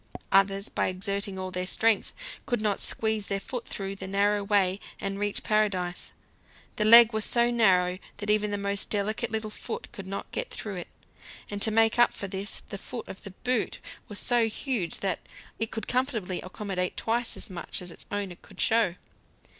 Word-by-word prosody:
Others, 195 +1 +3
by - - 0
exerting 200 +1 -1
all 185 0 -4
their 180 0 -2
strength, 220 +3 +3 0.4
could 240 -3 0
not 210 -2 0
squeeze 220 -2 0
their 200 -1 0
foot 240 +4 -5
through 195 0 -4
the 190 -1 -6
narrow 200 +1 +2
way 195 -2 +2 0.2
and 195 0 -3
reach 205 0 0
paradise. 200 -5 0 0.7
The 215 - +2
leg 230 +1 +10
was 220 0 0
so 240 +2 +3
narrow 185 -6 +3 0.2
that 205 0 -1
even 210 0 +2
the 205 - -1
most 200 0 -1
delicate 210 +1 0
little 220 -1 -3
foot - - -6
could 195 -5 -8
not 195 +1 -5
get - - -2
through 205 -4 -5
it, 175 - -5 0.6
and 205 0 -4
to 220 - +5
make 225 +1 +3
up 240 - +5
for 200 - -4
this 195 +2 -3
the 200 - -5
foot 245 +3 -7
of 190 - -9
the 195 -2 -7
boot 250 -3 0 0.3
was 205 - -6
so 240 0 +3
huge 225 - -2
that 190 -3 0 0.4
it 225 - 0
could 220 - -5
comfortably 240 -8 -1
accommodate 185 -1 -3
twice 235 +1 -1
as 215 - -8
much 175 -2 -5
as 180 -1 -8
its - - -14
owner 200 -4 -3
could - - -16
show. 220 -6 +4
205 Hz, 190 wpm, -28 LUFS, 190-220 Hz, 0.7 s, leg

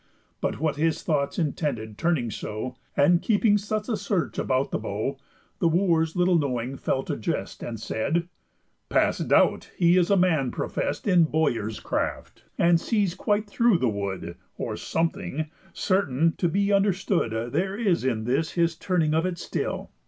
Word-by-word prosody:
But - - -2
what 155 -1 0
his 160 +1 0
thoughts 145 -4 0
intended 140 -9 -2
turning 140 -5 0
so, 110 +6 -5 0.2
And 170 +5 +5
keeping 210 -1 +3
such 210 +1 -3
a 235 - 0
search 200 -3 -2
about 130 +1 0
the - - -1
bow, 110 +6 -3 0.4
The 170 - +3
Wooers 165 -2 +2
little 180 -1 +3
knowing 130 -2 -2
fell 135 0 -1
to - - -3
jest, 110 - -3
And 115 -2 -5
said: 160 +11 -1 0.6
"Past - - +1
doubt - - +3
he 175 0 +4
is 175 -2 +3
a 200 - +4
man 160 -8 +2
profest - - -3
In 180 -4 +5
bowyers' 120 -9 0
craft, - - -3
and 170 -1 +4
sees 205 -5 +1
quite 205 +2 0
through 225 0 +3
the 130 -6 +1
wood; 95 -4 -4 0.2
Or - - -3
something, 155 -2 -2 0.2
certain, 165 -5 +1
to 175 - +2
be 200 +3 +1
understood 180 - +1
There 190 +6 -1
is 195 - +1
in 120 -4 0
this 140 +8 0
his 170 -1 +1
turning 165 -3 0
of 165 +3 +2
it 180 -2 -3
still. - - -4
165 Hz, 165 wpm, -26 LUFS, 130-185 Hz, 0.6 s, And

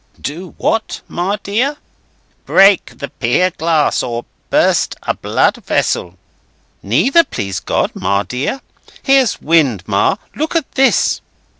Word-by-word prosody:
"Do 170 +5 -7
what, 225 0 -1
Ma 190 +4 -2
dear?" 250 +9 0 0.7
"Break 195 0 +4
the 140 - -6
pier 130 +10 +1
glass, 160 -2 +1
or 120 -1 -4 0.2
burst - - +2
a - - 0
blood - - +1
vessel." 90 +1 -1 0.6
"Neither, 260 - +3
please 95 - -4
God, - - -1
Ma 100 0 0
dear. 130 - -3 0.4
Here's 270 -5 +3
wind, 145 - +2
Ma. 100 - +2 0.2
Look 310 +3 -3
at 325 -5 -1
this!" 270 0 +2
170 Hz, 125 wpm, -16 LUFS, -, 0.7 s, Break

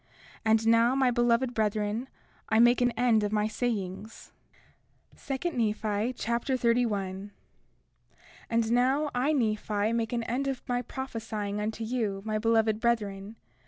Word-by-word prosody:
And 220 0 +3
now, 230 +2 +4
my 265 -2 +3
beloved 240 +1 +2
brethren, 215 +3 -1 0.4
I 220 - +3
make 240 +2 +5
an 245 - +4
end 235 -3 +2
of 205 - -1
my 210 0 +1
sayings. 215 -2 -4 0.8
2 280 +5 -3
Nephi 220 -2 -1
Chapter 235 +2 -1
31 205 -5 0
31:1 - - -28 1.2
And 230 -1 +1
now 265 +5 +2
I, 255 +5 +1
Nephi, 215 -4 0
make 230 -1 -1
an 235 -1 -1
end 255 +4 -2
of 270 -2 -4
my 245 0 0
prophesying 220 -6 -5
unto 220 +2 -3
you, 220 -4 -2
my 215 -1 -1
beloved 225 -1 +2
brethren. 210 -3 -1
230 Hz, 140 wpm, -28 LUFS, 215-245 Hz, 1.2 s, make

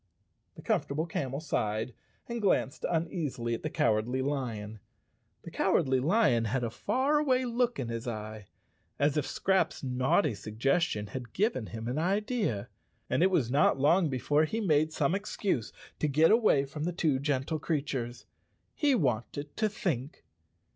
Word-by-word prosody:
The - - -12
Comfortable 150 +4 0
Camel 140 -5 -3
sighed 110 -6 -2 0.3
and 235 -1 -4
glanced 155 -8 +1
uneasily 160 -8 -2
at 115 - -3
the - - -3
Cowardly 115 +4 +1
Lion. 115 -7 -3 0.6
The - - -9
Cowardly 130 -1 +2
Lion 130 - +3
had 125 +3 -1
a 115 - -1
far¬ 275 - +1
away 260 -3 +2
look 240 -1 0
in 120 - -3
his 115 +1 -4
eye, 110 -2 -6 0.5
as 145 0 +2
if 150 -3 0
Scraps' 190 -5 0
naughty 130 - +2
suggestion 110 - 0
had 120 +2 -7
given 195 - 0
him 115 0 -6
an 130 +5 -1
idea, 200 - 0 0.4
and - - +2
it 185 - +5
was 140 -11 +1
not 140 -1 +3
long 160 +4 +4
before 145 +4 +2
he 220 +8 -3
made 155 -6 +2
some 150 0 +1
excuse 195 - -2 0.3
to 150 - +1
get 155 +5 +4
away 215 - +4
from 150 +3 -5
the 175 - -1
two 155 -6 +1
gentle 140 +2 -1
creatures. 135 -6 -3 0.5
He 290 -3 +2
wanted 145 - -2
to 215 -1 +2
think. 150 - -3
145 Hz, 155 wpm, -30 LUFS, 120-180 Hz, 0.6 s, it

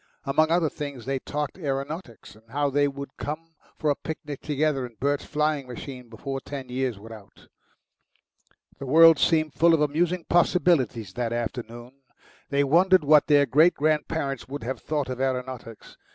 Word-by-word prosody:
Among 155 +3 +2
other 170 -1 +2
things 140 -5 -6
they 135 0 -1
talked 150 +6 -4
aeronautics, 140 -3 -5
and 110 +1 -22
how 145 +3 0
thev 145 0 +1
would 140 -1 -8
come 165 +3 -6 0.2
for 150 - +1
a - - +1
picnic 150 -2 -7
together 150 -2 0
in 120 -2 -8
Bert's 145 +2 0
flying 150 -2 -1
machine 125 0 -9
before 135 +4 -5
ten 135 -2 -7
years 125 -3 -2
were 110 +3 -11
out. 105 -3 -15 1.3
The 135 - -6
world 165 +2 +7
seemed 155 -3 +2
full 165 0 +4
of 155 - -1
amusing 165 +4 0
possibilities 155 - +2
that 120 0 -2
afternoon. 120 +2 -6 0.5
They 140 0 +2
wondered 180 +5 +4
what 150 0 +5
their 145 -1 +5
great 155 +6 +4
grandparents 150 -3 -1
would 140 -2 -6
have 130 +3 -4
thought 150 -3 -2
of 130 0 -4
aeronautics. 125 -3 -4
140 Hz, 165 wpm, -25 LUFS, 130-155 Hz, 1.3 s, world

